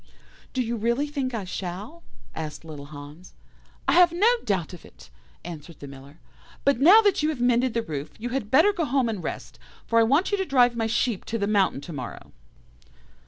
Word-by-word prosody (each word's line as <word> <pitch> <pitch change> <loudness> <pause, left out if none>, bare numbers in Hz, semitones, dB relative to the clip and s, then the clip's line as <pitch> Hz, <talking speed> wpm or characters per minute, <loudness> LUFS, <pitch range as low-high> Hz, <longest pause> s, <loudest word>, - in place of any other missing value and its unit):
"'Do 255 - 0
you 235 0 -3
really 235 +6 0
think 280 -3 -3
I 215 - -3
shall?' 190 - -6 0.3
asked 155 0 -6
little 150 -3 -9
Hans. 145 +4 -12 0.5
"'I - - +4
have 350 -1 +6
no 360 +6 +2 0.2
doubt 190 -5 -1
of 175 - -11
it,' - - -17 0.3
answered 165 -2 -9
the - - -8
Miller, 140 +2 -13 0.5
'but 280 -3 +3
now 370 +11 +8
that 405 -6 +2
you 305 - +1
have 305 -5 -3
mended 245 0 +2
the 230 - 0
roof, 150 -3 -5
you 240 +3 -5
had 245 -4 -3
better 320 - +5
go 345 -5 -1
home 265 -2 +1
and 205 -6 -4
rest, - - -6 0.3
for 230 - +2
I - - +6
want 280 - +2
you 405 - 0
to - - +1
drive 245 -5 +3
my 225 -1 -1
sheep 230 -2 0
to 230 - -3
the 200 - -1
mountain 200 -8 +1
to 165 +3 -9
morrow. 130 -4 -8
230 Hz, 210 wpm, -25 LUFS, 170-275 Hz, 0.5 s, now